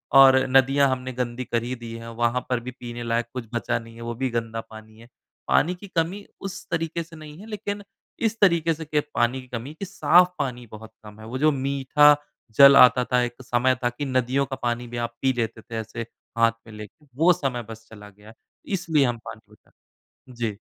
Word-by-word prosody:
और 135 -1 +9
नदियाँ 135 +1 +4
हमने 130 0 -3
गंदी 125 0 -3
कर 115 -1 -1
ही 125 +2 -3
दी 115 -1 -9
हैं। 115 0 -9 0.2
वहाँ 120 +1 +1
पर 125 -2 +1
भी 125 +2 -7
पीने 120 -1 -8
लायक 115 0 0
कुछ 125 -3 -5
बचा 120 0 -1
नहीं 115 0 -13
है 115 - -11
वो 120 0 -4
भी 130 +1 -1
गंदा 115 -1 -3
पानी 110 0 -13
है। 115 - -15 0.4
पानी 180 +4 +2
की 200 +3 -12
कमी 185 +5 -1 0.2
उस 195 -1 -7
तरीक़े 165 0 -2
से 165 0 -15
नहीं 155 +1 -11
है 210 - -11
लेक़िन 205 -1 -5 0.4
इस 225 0 0
तरीके 170 -4 +3
से 160 +1 -8 0.3
पानी 125 +2 +1
की 130 - -16
कमी 125 +5 -6
की 195 +5 -7
साफ़ 180 -2 +4
पानी 125 -2 -3
बहुत 110 +1 -11
कम 105 0 -13
है। 110 - -10
वो 130 +3 -4
जो 155 +2 +3
मीठा 140 +2 +4 0.4
जल 140 0 +9
आता 125 0 +7
था 125 - +4
एक 120 +1 -5
समय 125 +1 +2
था 120 - +3
कि 130 +4 -5
नदियों 130 +1 +1
का 135 0 -5
पानी 120 0 -1
भी 120 0 -7
आप 115 - -26
पी 130 -1 +2
लेते 115 -1 -3
थे। 115 - -9
ऐसे 110 +1 -6 0.3
हाथ 115 0 +5 0.2
में 110 - -12
लेके 105 +8 -12
वो 170 +5 +5
समय 125 -6 -3
बस 110 0 -10
चला 105 -2 -12
गया 105 +2 -16 0.4
इसलिए 160 -6 +2
हम 120 -1 -1
पानी - - -9
बचाते - - -26 0.6
हैं। - - -12
जी। 110 -4 -3
125 Hz, 220 wpm, -24 LUFS, 115-150 Hz, 0.6 s, और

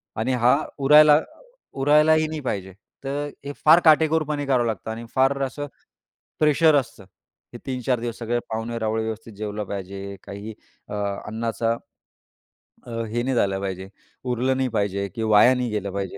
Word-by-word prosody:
आणि 120 +4 -1
हा 125 +2 +4 0.2
उरायला 150 +2 +7 0.6
उरायलाही 155 +2 +4
नाही 155 0 -5
पाहिजे. 95 -7 -4 0.3
तर 145 +2 -3 0.2
हे 145 - -4
फार 165 +3 +8
काटेकोरपणे 155 -2 +3
करावं 125 -3 +2
लागतं 110 0 -4
आणि 115 +1 -7
फार 135 +1 +2
असं 145 +2 -4 0.7
प्रेशर 155 +1 +4
असतं 125 -7 -2 0.5
हे - - -7
3-4 125 -2 -1
दिवस. 120 -1 -5
सगळे 120 +1 -1
पाहुणे-रावळे 110 0 -2
व्यवस्थित 110 0 -6
जेवले 105 0 -4
पाहिजे. 100 0 -6
काही 100 +2 -8 0.4
अ, - - -6 0.3
अन्नाचा 115 +1 -2 1.2
अ, - - -8
हे 115 +1 -3
नाही 130 -1 -1
झालं 95 -3 +1
पाहिजे. 95 -1 -5 0.3
उरलं 130 +1 0
नाही 130 -1 0
पाहिजे 100 -1 -1
की 115 - -3
वाया 110 +3 +6
नाही 125 -1 -2
गेलं 100 -2 -3
पाहिजे 100 -1 -4
120 Hz, 150 wpm, -23 LUFS, 105-140 Hz, 1.2 s, फार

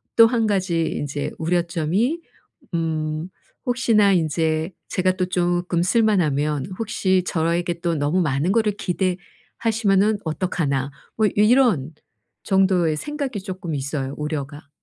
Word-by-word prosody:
또 230 -1 +8
1 225 -2 +1
가지 185 -5 +1
인제 145 -2 -3
우려점이 175 - 0 0.5
음 160 0 -2 0.4
혹시나 230 -5 +3
인제 160 0 0 0.2
제가 185 0 +1
또 185 - +1
쪼끔 175 -1 0
쓸만하면 155 - +1
'혹시 190 -4 +1
저에게 170 +1 -1
또 170 -1 0
너무 150 +5 +1
많은 150 +2 +1
거를 215 -1 +2
기대하시면은 205 +2 -1
어떡하나?' 150 -5 -1 0.3
뭐 220 -1 +4
요 - - -2
이런 210 - +3 0.5
정도의 185 -5 +2
생각이 280 - -4
쪼끔 185 -4 -5
있어요, 140 -1 -3
우려가. 150 -1 -5
175 Hz, 260 characters per minute, -22 LUFS, 155-205 Hz, 0.5 s, 또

